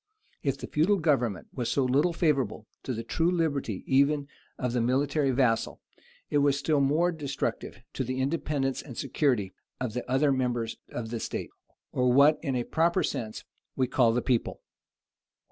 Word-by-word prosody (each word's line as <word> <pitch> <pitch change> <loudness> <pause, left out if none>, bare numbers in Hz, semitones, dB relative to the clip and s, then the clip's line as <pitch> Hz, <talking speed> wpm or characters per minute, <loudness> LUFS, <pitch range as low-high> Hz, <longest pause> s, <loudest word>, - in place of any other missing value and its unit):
If 140 -1 -1
the - - -6
feudal 175 +7 +2
government 130 - 0
was 125 -3 -2
so 135 - +1
little 140 +7 +3
favorable 150 -9 0 0.2
to 130 - -4
the 115 - -4
true 165 +8 +1
liberty 145 - -1
even 140 +1 +2 0.3
of 125 -2 -2
the 125 - +1
military 135 +4 +1
vassal, 125 -3 +1 0.5
it 145 - +3
was 140 -1 +3
still 145 +1 +1
more 155 +6 +3
destructive 135 - -4 0.2
of 130 - -1
the 130 0 -2
independence 135 -1 -1
and 125 -6 -10
security 115 - 0 0.3
of 125 -4 -3
the 125 - -3
other 135 +3 +3
members 120 -3 -1
of 115 -2 -5
the 115 - -2
state, - - -4 0.4
or 125 -1 +2
what 140 +4 +6
in 135 -5 -1
a 120 - 0
proper 170 +7 +1
sense 110 -2 -3 0.3
we 130 - +2
call 120 -2 +3
the 125 +1 0
people. 125 -3 0
135 Hz, 170 wpm, -28 LUFS, 125-150 Hz, 0.5 s, what